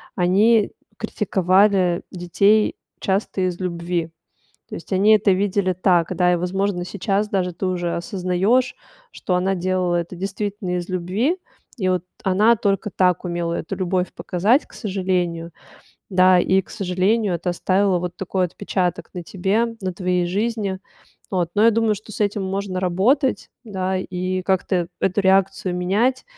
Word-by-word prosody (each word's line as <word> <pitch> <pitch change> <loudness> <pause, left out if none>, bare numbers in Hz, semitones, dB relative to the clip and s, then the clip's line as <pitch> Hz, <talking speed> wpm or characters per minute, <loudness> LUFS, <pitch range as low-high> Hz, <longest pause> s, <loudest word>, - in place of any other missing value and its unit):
они 200 +4 +3 0.3
критиковали 185 -2 +2
детей 200 +4 +2 0.2
часто 195 0 -1
из 175 -1 -4
любви. 170 -2 -2 0.6
То - - -8
есть 170 - -9
они 200 +3 +5
это 205 -1 +2
видели 195 0 +1
так, 180 -2 +2
да, 180 -1 +3
и, - - +1
возможно, 180 +1 -1
сейчас 200 +2 -1
даже 180 -3 -1
ты 180 - -5
уже 175 -2 -1
осознаёшь, 195 +6 0 0.4
что 185 - -3
она 185 +2 +1
делала 185 -1 0
это 170 +1 -3
действительно 195 0 -3
из 175 0 -4
любви. 190 - 0 0.4
И 190 -4 0
вот 180 -1 0 0.2
она 205 +5 +4
только 205 0 -1
так 180 -1 +1
умела 170 -1 -2
эту 175 +3 -4
любовь 185 0 -1
показать, 210 - +1
к - - -19
сожалению. 180 -5 -2 0.6
Да, 185 -1 +5
и, 190 +2 +3
к - - -24
сожалению, 195 +2 0
это 170 +1 -2
оставило 185 +2 +1
вот 175 0 -5
такой 190 -1 -1
отпечаток 180 0 -2
на 180 -2 -6
тебе, 195 +6 0 0.2
на 190 -1 -2
твоей 180 -1 0
жизни. 205 0 -2 0.5
Вот. 180 -3 0
Но 210 - +4
я 230 - +6
думаю, 225 -1 +1
что 215 +2 -12
с - - -8
этим 205 -1 0
можно 190 -1 -3
работать, 215 - +1
да, 190 -4 -2
и 185 0 -3
как-то 185 -2 0
эту 190 +2 +1
реакцию 190 -1 +2
менять, 210 +9 +1
185 Hz, 150 wpm, -21 LUFS, 180-200 Hz, 0.6 s, я